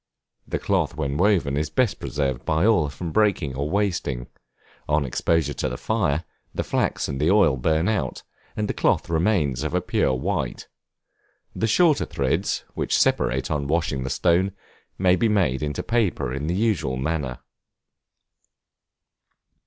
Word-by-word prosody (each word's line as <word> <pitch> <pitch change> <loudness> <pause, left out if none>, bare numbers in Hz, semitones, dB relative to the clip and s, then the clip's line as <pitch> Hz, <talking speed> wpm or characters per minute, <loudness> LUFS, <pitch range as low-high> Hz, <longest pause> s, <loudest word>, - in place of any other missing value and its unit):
The - - -1
cloth - - 0
when 70 -3 -2
woven 90 -5 +2
is 75 +1 -1
best 115 +5 +1
preserved 65 -4 -2
by 80 +7 +1
oil 100 -10 +3
from 85 +3 -6
breaking 100 -10 +1
or 70 +3 -2
wasting; 90 -11 -1 0.6
on 75 -1 +2
exposure 80 +5 0
to - - -2
the - - -5
fire, 75 +3 0 0.3
the - - -1
flax - - -1
and 70 0 -4
the 75 - +3
oil 100 -8 +5
burn 80 +6 +1
out, 110 -2 -1 0.3
and 105 -1 0
the - - -1
cloth - - +1
remains 80 - +1
of 75 +3 -2
a - - +3
pure 85 -6 +1
white. 65 - -3 0.9
The 110 - 0
shorter 155 +6 +3
threads, - - -1
which - - 0
separate 65 +3 +1
on 70 -2 -1
washing 75 -4 0
the 65 - -3
stone, 85 +9 +2 0.4
may 90 -1 +4
be 110 +5 +1
made 90 -11 +1
into 75 -1 -3
paper 110 - 0
in 70 +3 -3
the 85 - 0
usual 90 - 0
manner. 70 -3 -2
80 Hz, 155 wpm, -24 LUFS, 70-95 Hz, 0.9 s, oil